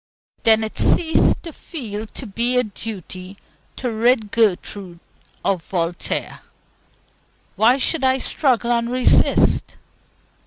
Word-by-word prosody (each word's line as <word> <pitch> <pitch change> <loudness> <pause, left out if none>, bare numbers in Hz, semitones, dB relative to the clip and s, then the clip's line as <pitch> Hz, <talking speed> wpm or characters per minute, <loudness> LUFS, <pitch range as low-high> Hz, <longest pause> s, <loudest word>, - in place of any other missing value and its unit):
Then 220 -1 +5
it 220 - -5
ceased 320 -2 +3
to 330 -3 -8
feel 220 - -6
to 255 - -9
be 235 +4 0
a 250 - +4
duty 195 -3 -8 0.4
to 250 -2 -3
rid 225 -1 +1
Gertrude 195 -4 -1 0.5
of 185 -4 0
Voltaire. 175 -1 -3 1.2
Why 240 +4 +4
should 280 +2 0
I 260 0 +3
struggle 250 -3 0
and 235 0 0
resist? 255 0 +2
225 Hz, 115 wpm, -20 LUFS, 200-250 Hz, 1.2 s, Then